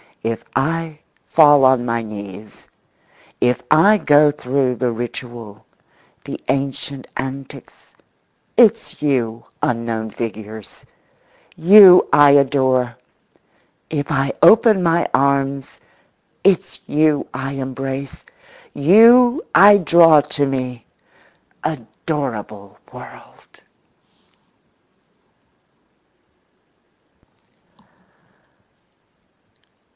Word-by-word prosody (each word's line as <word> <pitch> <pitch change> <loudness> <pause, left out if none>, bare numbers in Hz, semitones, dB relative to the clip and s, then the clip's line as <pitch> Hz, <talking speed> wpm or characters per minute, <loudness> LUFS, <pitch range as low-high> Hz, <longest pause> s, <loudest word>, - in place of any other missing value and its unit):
If 115 0 -4
I 165 +2 -3 0.3
fall 145 -3 +4
on 130 -2 +2
my 115 -1 -2
knees, 105 -1 -11 0.7
if 125 0 0
I 195 +8 +4
go 150 -2 +3
through 130 -2 -2
the 125 -1 -2
ritual, 120 -2 -9 0.6
the - - -8
ancient 135 0 -4
antics, 135 0 -10 0.6
it's - - +2
you, 120 -6 -2 0.2
unknown 115 -2 -3
figures, 110 -2 -9 0.7
you 185 +1 +6
I 145 -1 +6
adore; 130 -3 +1 0.9
if 145 -2 -5
I 135 0 -1
open 220 -4 +5
my 170 0 0
arms, 140 0 -1 0.6
it's 195 -3 0
you 150 -1 0
I 135 +1 -6
embrace, 135 0 -7 0.5
you 235 - +4
I 205 +2 +7
draw 165 -4 +4
to 145 0 -3
me—adorable 125 - -8
world! - - -14
135 Hz, 75 wpm, -17 LUFS, 120-155 Hz, 0.9 s, I